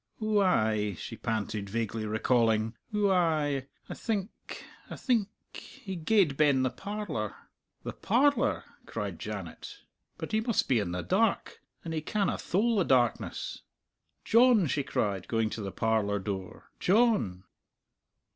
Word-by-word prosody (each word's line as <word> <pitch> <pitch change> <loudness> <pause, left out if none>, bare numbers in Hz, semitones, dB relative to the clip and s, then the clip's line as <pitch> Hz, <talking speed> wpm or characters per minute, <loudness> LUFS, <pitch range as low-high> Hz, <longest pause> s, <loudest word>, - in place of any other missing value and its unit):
Ou 215 -1 +2
ay," 110 - +2
she - - -7
panted, 105 -2 -3
vaguely 110 0 -2
recalling, 110 0 +2 0.2
"ou 205 -2 +2
ay. 155 -7 +1 0.2
I - - -5
think 210 -3 -5 0.2
I - - -6
think... 230 -6 +1 0.2
he 215 -9 -8
gaed 170 -3 +2
ben 140 -4 +4
the 130 - +1
parlour." 195 - -4 0.5
"The - - -5
parlour!" 275 +7 +2 0.2
cried - - -4
Janet; 410 - -7 0.3
"but - - -6
he 220 0 +2
must 230 -1 0
be 125 -4 +3
in 100 -4 -2
the 90 0 -3
dark! - - +1 0.3
And 165 - -4
he 155 - -1
canna 200 +5 -1
thole 220 +5 +1
the 190 - +4
darkness!" 125 -6 0 0.6
"John!" 235 -4 +5
she 145 0 0
cried, 100 -8 -2
going 115 -2 0
to 110 - -4
the 100 -1 -4
parlour 110 -2 +1
door, 95 -2 -6
"John!" 190 - +2
140 Hz, 140 wpm, -29 LUFS, -, 0.6 s, John